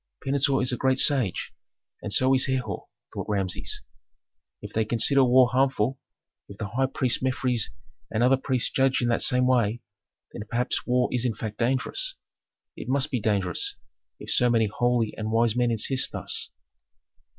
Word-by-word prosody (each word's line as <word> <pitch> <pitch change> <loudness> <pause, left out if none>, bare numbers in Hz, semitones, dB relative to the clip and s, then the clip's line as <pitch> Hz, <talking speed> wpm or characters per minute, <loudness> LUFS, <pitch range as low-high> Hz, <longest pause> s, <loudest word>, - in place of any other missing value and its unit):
"Pentuer 135 -1 +1
is 125 - 0
a 125 - -2
great 130 -1 +1
sage, 130 - +2 0.5
and 105 - -5
so 130 +6 +3
is 130 +1 +2
Herhor," 125 -6 -3 0.3
thought - - -6
Rameses. 95 -3 -2 0.8
"If - - -10
they 110 - +1
consider 120 +5 +3
war 125 0 +5
harmful, 130 -1 +1 0.5
if 100 - -11
the 105 -3 -5
high 130 +5 0
priest 130 -3 -1
Mefres 130 -3 0 0.4
and 110 +2 0
other 130 +2 +5
priests 130 -2 -1
judge 135 -1 +1
in 120 - +1
the 115 - +1
same 125 0 +4
way, 120 -3 +1 0.5
then - - -7
perhaps 120 +1 -2
war 125 0 +2
is 125 -1 0
in 120 -4 -1
fact 105 -1 -6
dangerous. 135 - -1 0.6
It - - -8
must 140 +2 0
be 125 - 0
dangerous, 100 -5 -1 0.4
if - - -6
so 125 - +3
many 115 -2 +3
holy 120 +1 0
and 110 0 -3
wise 115 0 +2
men 125 -1 +2
insist 120 +3 +1
thus." - - -1
125 Hz, 170 wpm, -25 LUFS, 110-130 Hz, 0.8 s, war